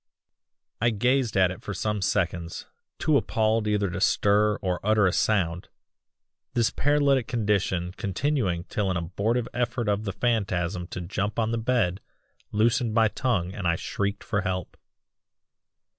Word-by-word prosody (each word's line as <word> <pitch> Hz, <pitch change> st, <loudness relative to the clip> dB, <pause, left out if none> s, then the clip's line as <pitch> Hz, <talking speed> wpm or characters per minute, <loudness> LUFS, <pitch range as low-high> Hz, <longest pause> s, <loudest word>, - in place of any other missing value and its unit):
"I 115 Hz, -, +4 dB
gazed 120 Hz, +1 st, +1 dB
at 95 Hz, -1 st, +4 dB
it 90 Hz, -, -8 dB
for 100 Hz, -, -5 dB
some 105 Hz, +2 st, -1 dB
seconds 85 Hz, -2 st, -1 dB, 0.3 s
too 155 Hz, -2 st, +3 dB
appalled 110 Hz, -3 st, +1 dB
either 105 Hz, -1 st, +1 dB
to -, -, -4 dB
stir 105 Hz, +1 st, +3 dB
or 90 Hz, -2 st, -2 dB
utter 105 Hz, -1 st, +3 dB
a 95 Hz, -, +2 dB
sound 90 Hz, -5 st, 0 dB, 0.9 s
this 120 Hz, -2 st, +2 dB
paralytic 140 Hz, -3 st, +2 dB
condition 100 Hz, -6 st, 0 dB
continuing 100 Hz, -, -1 dB
till 100 Hz, +1 st, -2 dB
an 90 Hz, -, 0 dB
abortive 100 Hz, +8 st, -1 dB
effort 120 Hz, -1 st, -1 dB
of 105 Hz, +1 st, 0 dB
the 100 Hz, -, -1 dB
phantasm 90 Hz, -6 st, -1 dB
to 90 Hz, -, -6 dB
jump 95 Hz, +3 st, -3 dB
on 115 Hz, -1 st, +1 dB
the 115 Hz, -, -1 dB
bed 110 Hz, -6 st, 0 dB, 0.5 s
loosened 110 Hz, +1 st, +1 dB
my 110 Hz, -2 st, +4 dB
tongue 100 Hz, -8 st, -1 dB
and 100 Hz, -3 st, -3 dB
I 85 Hz, -, +3 dB
shrieked 100 Hz, +3 st, -3 dB
for 105 Hz, -2 st, -1 dB
help. 90 Hz, -1 st, -3 dB
105 Hz, 150 wpm, -26 LUFS, 90-115 Hz, 0.9 s, I